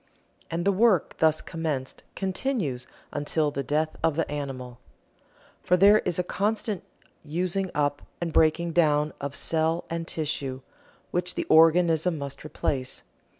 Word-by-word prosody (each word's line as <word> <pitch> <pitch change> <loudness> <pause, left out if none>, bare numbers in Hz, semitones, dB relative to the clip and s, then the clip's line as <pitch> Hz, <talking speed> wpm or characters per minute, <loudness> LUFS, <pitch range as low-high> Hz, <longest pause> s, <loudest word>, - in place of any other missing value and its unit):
And 170 +2 -2
the 200 - +4
work 200 -3 +2
thus 160 -1 +3
commenced 155 -6 -4
continues 190 - -2 0.2
until 150 +1 0
the 140 - -2
death 155 +3 -1
of 165 -2 +2
the 165 - 0
animal. 130 -4 -5 0.8
For 180 - +3
there 200 +3 +7
is 175 -2 -2
a 180 - +1
constant 210 +2 -1 0.4
using 180 +5 -1
up 145 -1 0 0.2
and 170 -2 -3
breaking 165 +2 +3
down 150 -3 +3
of 140 0 -4
cell 165 +1 0
and 165 0 -3
tissue, 140 -4 -3 0.5
which 180 +1 -1
the - - -2
organism 165 +1 +5
must 140 -1 -6
replace. 135 -4 -3
160 Hz, 140 wpm, -26 LUFS, 145-180 Hz, 0.8 s, there